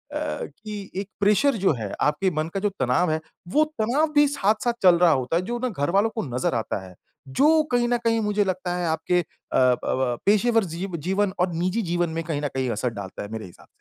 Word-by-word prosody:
कि 215 - -5
एक 195 +1 -4
प्रेशर 210 +7 +3
जो - - +5
है 110 -6 -5
आपके 150 +6 +2
मन 155 - -3
का 195 - -1
जो 205 +1 +1
तनाव 130 +7 +2
है, 155 - 0 0.3
वो 300 - +3 0.2
तनाव 275 +8 +1
भी 290 0 +6
साथ-साथ 230 -3 +1
चल 180 -2 +7
रहा 175 -2 +6
होता 130 +1 0
है, 170 - +2
जो 240 +6 -4
ना 255 +1 -1
घरवालों 195 +4 +1
को 220 - -1
नज़र 125 0 0
आता 110 -4 -3
है। 90 - -14 0.4
जो 290 - +5 0.2
कहीं 245 -1 +2
ना 245 0 +2
कहीं 230 -1 +1
मुझे 210 -1 +1
लगता 185 -1 -2
है 175 - -1
आपके 160 +2 +1
अ, - - -8 0.3
ब 125 -1 +4
अ, 130 -2 0
पेशेवर 225 +3 +3
जी 180 +4 -3 0.2
जीवन 190 +1 +1
और 180 0 +2
निजी 180 +7 0
जीवन 175 -3 0
में 165 +1 -3
कहीं 155 -3 -3
न 145 - 0
कहीं 130 -1 0
असर 115 +3 -1
डालता 100 -2 -7
है 100 - -8
मेरे 110 -1 -5
हिसाब 90 - -15
से। - - -34
185 Hz, 230 wpm, -24 LUFS, 150-220 Hz, 0.4 s, चल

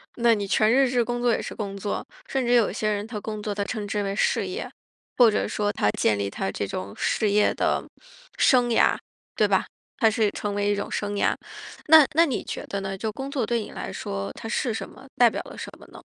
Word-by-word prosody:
那 235 -1 +4
你 200 -2 -2
全 215 +3 +3
日 270 -1 +4
制 245 -2 +1
工 240 0 -2
作 240 -1 +3
也 - - +1
是 - - -5
工 200 -2 -5
作。 200 +1 -3 0.2
甚 270 -1 -1
至 240 0 +2
有 235 -6 +4
些 215 -1 -1
人 205 0 -1
他 220 -2 -6
工 215 -1 -5
作 210 - -2
他 200 0 -2
称 210 -3 -4
之 205 +1 -1
为 195 0 -2
事 - - +1
业， - - -4 0.5
或 240 -3 +7
者 210 - 0
说 205 -1 -1
他 105 - +1
建 105 0 +1
立 100 - -1
他 95 -1 -3
这 100 - -3
种 95 0 -5
事 215 - +1
业 205 +1 +3
的 - - 0 0.5
生 245 -2 +4
涯， 230 - +3 0.4
对 - - +3
吧， - - +1 0.3
它 225 - +5
是 215 -1 +1
成 205 -1 -4
为 205 0 0
一 - - +1
种 200 - -4
生 205 0 -2
涯。 - - +2 0.5
那 315 0 +9
那 335 - +6
你 270 -7 -2
觉 - - -6
得 200 0 -4
呢， 195 0 -4
就 220 +2 -3
工 270 +5 -6
作 260 -5 -1
对 235 +1 0
你 - - -8
来 95 - -6
说， 100 0 -4
它 225 - -8
是 235 0 0
什 225 - -5
么， 260 - -15
代 240 -1 +7
表 - - -4
了 - - -11
什 - - -7
么 - - -15
呢？ - - -11
215 Hz, 270 characters per minute, -25 LUFS, 200-240 Hz, 0.5 s, 那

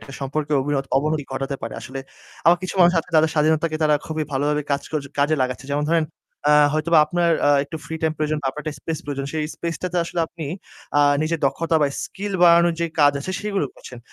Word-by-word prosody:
একটা 135 - -12
সম্পর্কের 145 +2 -2
অবিনত 140 0 -1
অবনতি 150 +1 0
ঘটাতে 135 +1 -3
পারে 115 - -5
আসলে। 135 +1 -7 0.5
আবার 175 +1 +7
কিছু 185 - -4
মানুষ 175 0 +6
আছে 165 - -4
তাদের 155 0 +4
স্বাধীনতাকে 155 +1 +2
তারা 150 -1 +4
খুবই 155 -1 -2
ভালোভাবে 145 +2 0
কাজ 140 - +1
ক - - -21 0.3
কাজে 145 +2 +3
লাগাচ্ছে। 130 +1 -3
যেমন 145 +1 0
ধরেন, 165 -1 +3 0.4
আ 150 - +6 0.2
হয়তোবা 155 +1 +3
আপনার 175 +1 +1 0.2
আ - - +5 0.2
একটু 160 - -7
free 160 - -5
time 160 -1 +1
প্রয়োজন 155 0 -1
বা - - -1
আপনার 150 +3 -8
একটা 155 -2 -4
space 160 -2 -4
প্রয়োজন। 140 -1 -4
সেই 155 -1 -1
space 170 -1 -4
টাতে 180 -1 -2
আসলে 170 0 -3
আপনি 160 -2 -8 0.5
আ - - +6 0.2
নিজের 160 +1 -1
দক্ষতা 160 +4 0
বা - - +4 0.2
skill 200 +1 -6
বাড়ানোর 170 0 +6
যে 170 - +1
কাজ 145 0 +6
আছে 185 - -4
সেগুলো 200 -6 -1
করছেন। 125 - -11
155 Hz, 215 wpm, -22 LUFS, 145-165 Hz, 0.5 s, আবার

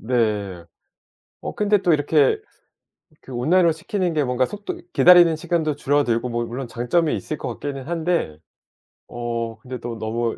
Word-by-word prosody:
네. 105 -7 -1 0.8
어 - - -5
근데 210 -1 +2
또 180 -3 +2
이렇게 145 -1 +3 0.8
그 130 - -12
온라인으로 165 +8 +3
시키는 175 +2 -2
게 150 -2 +1
뭔가 125 0 +1
속도 210 0 -7
기다리는 175 -2 +7
시간도 160 -2 -1
줄어들고 130 -5 +1
뭐 120 0 -2
물론 125 +3 -5
장점이 125 +8 0
있을 155 - -4
것 - - -6
같기는 135 -2 -5
한데 165 - -1 0.7
어 115 -1 -4
근데 125 +1 -7
또 115 -1 -6
너무 115 +1 -2
135 Hz, 305 characters per minute, -22 LUFS, 120-165 Hz, 0.8 s, 기다리는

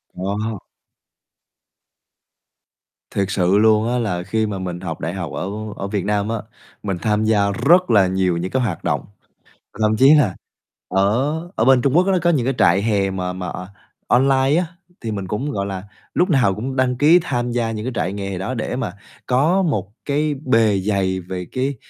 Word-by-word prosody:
Wow. 100 +3 -3 2.5
Thiệt 100 - 0
sự 95 0 +2
luôn 110 +1 +4
á, 125 +1 0
là 90 -7 -2
khi 110 +3 0
mà 100 -2 -4
mình 90 -2 -4
học 85 -4 -5
đại 85 - -3
học 85 -6 -5
ở 90 - -3 0.3
ở 100 - -4
Việt 100 -2 -2
Nam 105 0 0
á, 115 - -1 0.5
mình 95 -3 -2
tham 105 -1 +1
gia 105 -2 +2
rất 175 - +3
là 100 -4 +5
nhiều 95 -2 0
những 90 +2 -3
cái 130 - +1
hoạt 95 -8 -3
động, - - -1 0.8
thậm 110 0 +3
chí 135 +5 +7
là 125 -11 +2 0.5
ở 110 +11 +1 0.2
ở 110 - +1
bên 130 -1 +5
Trung 140 +4 +2
Quốc 180 +2 +4
nó 190 -1 +3
có 175 - +2
những 145 -8 +1
cái 135 0 0
trại 90 +3 +4
hè 100 -3 +1
mà 90 -1 -3
mà 90 0 -5 0.6
online 135 +2 +3
á, 180 - 0 0.4
thì 115 - -4
mình 100 -3 -4
cũng, 130 +10 -3
gọi 100 -4 -2
là, 95 -1 -5 0.3
lúc 180 - +2
nào 125 - +3
cũng 130 +6 -4
đăng 125 -1 +1
ký 155 +6 +6
tham 125 -6 -2
gia 120 -1 -1
những 110 0 -5
cái 130 - -2
trại 90 +4 -1
nghè 100 -2 -4
đó 95 +7 -3
để 120 0 -3
mà 120 -8 -3 0.3
có 155 +10 +3
một 105 - -1
cái 150 +1 0
bề 115 -5 +3
dày 95 -1 0
về 90 0 -6
cái 135 +2 -1
110 Hz, 195 wpm, -20 LUFS, 95-130 Hz, 2.5 s, chí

